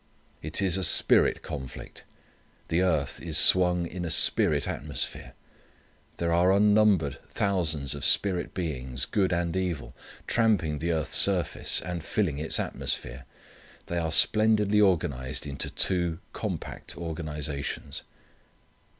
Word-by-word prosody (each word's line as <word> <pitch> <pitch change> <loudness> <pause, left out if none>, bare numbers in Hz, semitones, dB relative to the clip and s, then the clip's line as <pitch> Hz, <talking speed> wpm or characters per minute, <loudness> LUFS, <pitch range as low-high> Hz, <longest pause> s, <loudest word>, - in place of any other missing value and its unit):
It 80 +6 -1
is 95 -1 +3
a 95 - -2
spirit - - +3
conflict. 70 -5 -8 0.6
The 85 +2 +1
earth 80 -7 -1
is 80 -2 0
swung 90 +3 +5
in 90 +1 -6
a 85 - -3
spirit 80 - +3
atmosphere. - - -5 0.8
There 85 0 -1
are 90 +2 +3
unnumbered 105 -6 +3
thousands 80 -8 0
of 70 - -7
spirit 95 -3 +1
beings 65 -6 -3
good 95 +2 0
and 85 0 -1
evil, 85 -10 -3 0.3
tramping 95 -10 +1
the 85 +3 -2
earth's 80 -1 -1
surface, 95 -4 +2
and 85 -2 -5
filling 80 -7 -2
its 80 - -1
atmosphere. 65 +1 -4 0.6
They 85 - -3
are 80 -1 -2
splendidly 105 +2 +4
organized 70 -11 0
into 70 -1 -5
two 85 -3 0 0.2
compact - - -6
organizations. 75 -4 -5
85 Hz, 125 wpm, -27 LUFS, 75-95 Hz, 0.8 s, swung